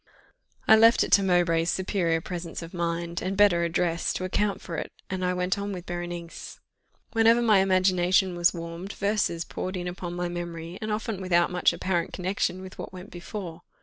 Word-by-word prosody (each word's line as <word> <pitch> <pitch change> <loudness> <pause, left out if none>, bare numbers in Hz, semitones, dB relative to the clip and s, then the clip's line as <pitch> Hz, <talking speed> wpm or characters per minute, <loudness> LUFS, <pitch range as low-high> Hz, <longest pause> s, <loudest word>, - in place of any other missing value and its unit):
I 220 - +9
left 230 +1 +6
it - - -4
to 200 - +7
Mowbray's 175 -3 +2
superior 180 -4 0
presence 170 -1 -6
of 165 - -10
mind, 170 0 -2
and 190 +1 -3
better 195 -5 +5
address, 170 0 0
to - - -4
account 200 +2 0
for 170 - -7
it, - - -5 0.2
and 190 -1 -2
I 180 0 +1
went 180 +2 0
on 200 0 -3
with 180 -2 -6
Berenice. 175 -1 -6 0.5
Whenever 225 +1 +5
my 215 -4 +5
imagination 185 -1 +3
was 175 0 +4
warmed, 170 +3 -7
verses 200 -5 0
poured 185 +1 -4
in 180 0 -4
upon 175 0 -5
my 175 0 -2
memory, 175 0 -6
and 215 0 -3
often 210 -2 -3
without 175 -2 +2
much 180 0 +3
apparent 175 -3 -2
connexion 185 0 -2
with 185 - -11
what - - -6
went 185 +1 -10
before. 175 -1 -7
180 Hz, 185 wpm, -26 LUFS, 170-190 Hz, 0.5 s, I